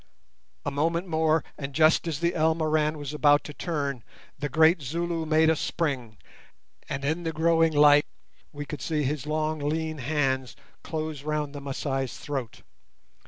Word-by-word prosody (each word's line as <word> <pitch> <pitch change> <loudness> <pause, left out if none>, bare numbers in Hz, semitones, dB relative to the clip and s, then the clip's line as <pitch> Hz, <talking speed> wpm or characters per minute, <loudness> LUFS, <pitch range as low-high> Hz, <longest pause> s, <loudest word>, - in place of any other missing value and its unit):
A 145 - -1
moment 165 +5 0
more, 160 -2 +2 0.2
and, 140 -2 -6
just 160 +2 +4
as 155 -4 -2
the 170 0 +1
Elmoran 155 -1 +1
was 145 0 -6
about 145 -1 +4
to 150 - -8
turn, 140 -7 -3 0.4
the 145 - -2
great 160 +4 +4
Zulu 165 +3 -2
made 160 +1 +4
a 160 - +4
spring, 135 -9 -2 0.7
and 140 0 -3
in 160 +4 0
the 165 -1 -2
growing 165 +1 +3
light 145 0 +6 0.4
we 145 -1 -6
could 150 0 -7
see 155 -2 -1
his 145 +1 -2
long 155 0 -1
lean 155 +1 -2
hands 130 -2 -1 0.3
close 155 -3 -4
round 150 -1 -2
the 145 - -7
Masai's 135 -2 -3
throat. 135 -5 -5
150 Hz, 160 wpm, -27 LUFS, 145-160 Hz, 0.7 s, light